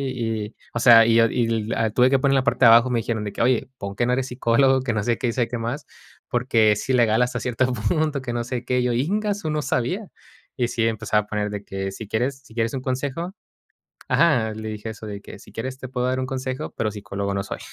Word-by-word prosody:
y" 110 -3 -3 0.2
O 120 - -1
sea, 115 -2 +8
y 115 0 +3
yo 115 0 +6
y 120 +1 +1 0.2
l 115 -1 0
Tuve 125 +3 +4
que 135 - +4
poner 135 +1 +2
la 135 - +3
parte 130 -1 +3
de - - +9
abajo. 115 +2 +6
Me 120 - +2
dijeron 110 -1 -2
de 100 - -5
que: - - -4
"Oye, 125 +1 +2
pon 100 -2 -6
que 120 - +1
no 125 - +1
eres 130 0 0
psicólogo, 130 +1 +2
que 125 -3 -2
no 105 - 0
sé 115 +1 +1
qué, 125 - -1
y 115 - -1
sabe 120 -1 0
qué 120 - -3
más, 115 +5 -4 0.4
porque, 115 -3 +3
sí, 130 - -2
legal, 115 -2 +3
hasta 125 - 0
cierto 125 +1 0
punto 140 +6 0
que 125 -2 -4
no 120 0 -1
sé 125 -1 -4
qué". 125 +1 0
Y - - +1
yo: 125 -1 +1
"¡Ingasu!, 200 - -1
no 150 0 0
sabía". 145 - -1 0.5
Y 125 -2 +1
sí, 115 -1 -1
empezaba 110 -1 +1
a - - -21
poner 105 0 -2
de 105 0 -5
que: 95 0 -4
"Si 105 +2 -8
quieres 125 +6 -1
si 115 - -17
quieres 115 0 -1
un 135 - -3
consejo". 140 +7 -3 0.8
Ajá, 125 -10 +3
le 110 0 -6
dije 110 +1 -5
eso 110 0 -9
de 100 -1 -6
que: - - -11
"Si - - -16
quieres 130 +3 -5
te 130 - -7
puedo 125 0 -2
dar 130 +1 0
un 130 - -2
consejo, 130 +1 -4
pero 110 - 0
psicólogo 100 -1 -4
no 100 - -1
soy". - - -6
120 Hz, 260 wpm, -23 LUFS, 110-130 Hz, 0.8 s, de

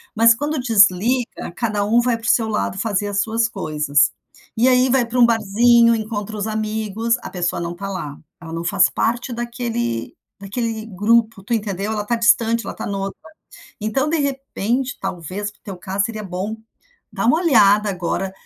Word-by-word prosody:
mas 230 +1 +6
quando 290 +4 -2
desliga, 225 0 +2
cada 215 -4 -1
um 230 +3 +3
vai 240 -1 +1
para 225 - -11
o - - +1
seu 225 -2 +3
lado 210 -3 -2
fazer 205 -1 -1
as 200 0 0
suas 225 +1 0
coisas, 150 -7 +1 0.5
e 235 +3 +4
aí 255 0 +4
vai 255 -1 +3
para 240 +2 -2
um 240 - +8
barzinho, 230 +1 +4
encontra 215 -1 -4
os 205 +1 -2
amigos, 220 +1 -1
a - - -7
pessoa 175 -1 -2
não 170 0 -4
está 195 +3 -6
lá, 150 -7 -5 0.2
ela 165 -1 -9
não 165 0 -4
faz 190 +2 +4
parte 240 +2 -1
daquele 235 - -3 0.3
daquele 220 +2 -3
grupo, 220 +1 +1
tu 235 - -3
entendeu? 205 -2 -2
Ela 210 -1 -2
está 235 +3 -1
distante, 230 0 +2
ela - - -4
está - - -6
em 200 - -3
outra. 195 0 -4 0.6
Então, 240 +7 0
de 330 - +1
repente, 270 -2 -2
talvez 185 +4 -5
no - - -30
teu 195 -3 -7
caso, 195 +2 -1
seria 220 -2 -6
bom, 190 +4 -4 0.6
dar - - -2
uma 265 +6 +4
olhada 210 - +4
agora 185 +1 -3
220 Hz, 185 wpm, -20 LUFS, 195-235 Hz, 0.6 s, um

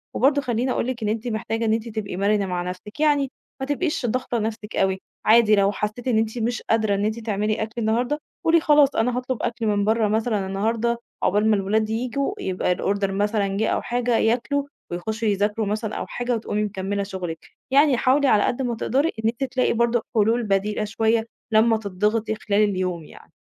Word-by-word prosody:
وبرضو 285 +3 +3
خليني 250 0 -1
أقول 240 - -1
لِك 245 -3 -3
إن 210 - 0
أنتِ 225 +2 -2
محتاجة 225 0 -2
إن 220 - +2
أنتِ 225 +1 -2
تبقي 210 -4 -4
مَرِنة 200 0 +2
مع 180 -1 -2
نفْسِك، 185 +7 -8
يعني 290 -3 +2 0.3
ما 265 - -2
تبقيش 290 0 -1
ضغطة 245 +1 -1
نفْسِك 220 0 -4
أوي، 190 0 +1 0.2
عادي 220 -1 +6
لو 200 0 +3
حسيتِ 215 +5 -4
إن 230 -3 +2
أنتِ 220 +2 0
مش 235 +2 -1
قادرة 220 -3 +2
إن 200 +1 0
أنتِ 220 +2 -1
تعملي 215 0 -1
أكل 220 - -6
النهارده، 245 +7 0 0.3
قولي 330 0 +5
خلاص 295 -2 +4
أنا 245 +2 +1
هاطلب 250 -2 -3
أكل 230 0 -2
من 205 -1 +1
برّا 220 0 +2
مثلًا 215 -2 0
النهارده، 225 +4 0 0.3
عَبال 210 +3 +3
ما 215 - +5
الولاد 215 +2 0
ييجوا، 255 - -1
يبقى 185 - 0
الOrder 200 +1 0
مثلًا 200 0 0
جا 220 - +1
أو - - 0
حاجة، 245 -1 0
ياكلوا 250 +5 +1 0.3
ويخشوا 220 +6 -3
يذاكروا 210 +2 +1
مثلًا 215 +1 -2
أو - - -3
حاجة 245 0 -2
وتقومي 210 -1 -2
مكملة 200 0 -2
شغلك. 180 -4 -6 0.2
يعني 280 -2 +5
حاولي 275 +3 +3
على 210 -5 +4
قد 250 +2 0
ما 245 -2 -1
تقدري 275 +8 +1
إن 225 - +3
أنتِ 240 +4 -4
تلاقي 255 -2 +1
برضو 235 +1 +2 0.2
حلول 225 +2 +3
بديلة 210 +1 0
شوية، 225 +1 +1 0.3
لمّا 220 +1 +4
تضِّغطِي 215 +2 -1
خلال 210 -1 +1
اليوم 185 -4 -1
يعني. - - -16
220 Hz, 195 wpm, -23 LUFS, 205-240 Hz, 0.3 s, عادي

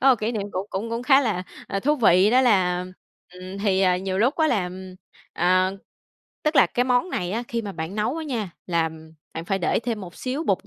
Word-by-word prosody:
có 270 - +6
một 255 - +4
kỷ 220 +2 -1
niệm 215 -3 -2
cũng 185 +2 -3
cũng 215 +4 -4
cũng 230 +1 -3
khá 270 +2 +5
là, 215 -9 -1 0.3
ờ, 195 - -2
thú 295 +7 +2
vị 200 -5 +5
đó 255 +2 +5
là 180 -7 +2 0.5
ừm, 185 +2 -8
thì, 195 -2 +1
à, 185 -2 +3
nhiều 190 0 -3
lúc 245 +7 +2
á 315 -1 +3
là, 205 -9 +1
ừm, 185 +1 -8 0.4
à, 185 +2 +2 0.7
tức 305 0 0
là - - +7
cái 245 - 0
món 250 +8 +1
này 180 - -2
á 230 +3 -1
khi 235 -1 -2
mà 205 -2 -5
bạn 160 +2 -5
nấu 215 +6 -1
đó 325 - -4
nha, 240 - -3 0.2
làm 160 -2 -2 0.2
bạn 165 - -5
phải 195 +2 -1
để 175 - +1
thêm 230 -2 -3
một 180 -2 -9
xíu 270 +5 -3
bột - - 0
200 Hz, 240 wpm, -24 LUFS, 185-245 Hz, 0.7 s, là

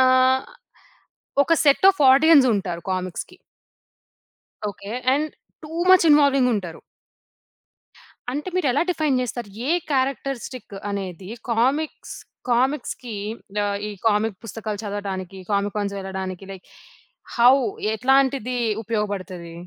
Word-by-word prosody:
ఆహ్, 255 0 +4 1.0
ఒక 330 - +3
set 285 +6 +5
of 385 - -9
audience 280 0 +6
ఉంటారు 180 -4 -3
కామిక్స్‌కి. 185 -1 -5 1.3
ఓకే. 200 0 -9 0.2
And 300 +3 0 0.4
too 305 - -9 0.2
much 370 -2 +7
ఇన్వాల్వింగుంటారు. 255 - +3 1.5
అంటే 295 +7 -3
మీరెలా 285 -6 +2
డిఫైన్ 305 -6 +1
చేస్తారు? 240 -3 -4 0.2
ఏ - - +3 0.2
క్యారెక్టరిస్టిక్ 265 -3 -2 0.2
అనేది 190 -2 -5 0.2
కామిక్స్, 265 +7 0 0.4
కామిక్స్‌కి 250 -2 -1 0.5
ఆహ్, 200 0 -1
ఈ - - -5 0.2
కామిక్ 210 -2 +1
పుస్తకాలు 215 -1 -5
చదవటానికి, 195 -2 -5
కామికాన్స్ 200 0 -1
వెలటానికి 190 -1 -5
లైక్ 190 -1 -11 0.7
హౌ? 245 +2 +7 0.4
ఎట్లాంటిది 265 0 +2 0.3
ఉపయోగపడతది? 195 -6 -4
230 Hz, 100 wpm, -23 LUFS, 200-270 Hz, 1.5 s, much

